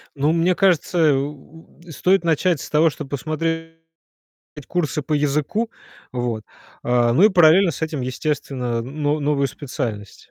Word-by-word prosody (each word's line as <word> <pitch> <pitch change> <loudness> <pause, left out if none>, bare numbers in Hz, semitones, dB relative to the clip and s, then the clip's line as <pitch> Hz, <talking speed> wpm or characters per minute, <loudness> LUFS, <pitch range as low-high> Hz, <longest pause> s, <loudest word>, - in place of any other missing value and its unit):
Ну, 145 +3 +1
мне 170 +2 +2
кажется, 180 -2 +2
э, 155 -3 +5
у 145 +3 -6 0.2
у 170 - -11
стоит 180 +3 +1
начать 165 -1 +1
с - - -8
того, 155 +1 +4
что - - -7
посмотреть 165 +3 -3 0.9
курсы 155 -4 -1
по 150 - -5
языку. 150 +10 0 0.4
Вот. 120 -4 -3 0.4
А, 120 -1 +2
ну 160 +11 +3
и 215 - +8
параллельно 175 0 +5
с 160 - -8
этим, 155 -3 -2
естественно, 125 -3 -3
но 145 +3 -2
новую 145 -1 +1
специальность. 120 -7 -6
150 Hz, 150 wpm, -21 LUFS, 135-165 Hz, 0.9 s, и